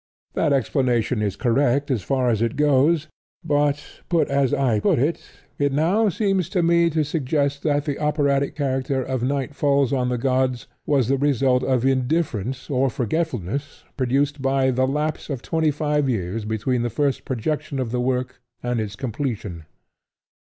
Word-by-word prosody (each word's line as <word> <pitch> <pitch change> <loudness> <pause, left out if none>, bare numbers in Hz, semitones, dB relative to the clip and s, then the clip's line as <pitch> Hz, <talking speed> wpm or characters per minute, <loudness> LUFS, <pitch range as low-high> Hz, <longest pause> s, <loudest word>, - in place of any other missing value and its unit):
That - - +1
explanation 125 -3 +1
is 100 -2 -1
correct 135 +4 +1
as 120 -6 0
far 130 +4 +1
as 110 -1 0
it 115 -1 0
goes; 150 +2 +3 0.4
but, 145 0 +1 0.2
put 170 -2 +2
as 140 -2 +2
I 120 -6 +2
put - - +2
it, 145 +7 0 0.4
it 140 -1 +2
now 180 +10 +2
seems 195 -3 0
to 180 -3 +1
me 170 0 +4
to 155 -1 +1
suggest 140 -1 -1
that 145 -2 0
the 145 -3 -2
operatic 140 -2 +1
character 135 -1 -1
of 130 -1 -3
Night 140 +2 -1
Falls 140 -2 +2
On 125 -2 +1
The 125 - 0
Gods 130 0 0 0.2
was 135 -6 +2
the 135 +1 +1
result 135 -2 +2
of 130 -2 +1
indifference 130 - 0
or 135 -1 +1
forgetfulness 135 - -3
produced 140 +3 0
by 135 0 +2
the 130 +1 +1
lapse 150 +4 -2
of 135 -5 -4
twenty 160 -2 +1
five 150 -1 0
years 105 -1 -2
between 115 +3 -1
the 120 - -1
first 140 +3 -1
projection 145 +4 -3
of 125 -4 -2
the 125 0 0
work 125 0 -2 0.2
and 120 -1 -1
its 105 -1 -5
completion. 110 - -4
135 Hz, 165 wpm, -23 LUFS, 125-145 Hz, 0.4 s, me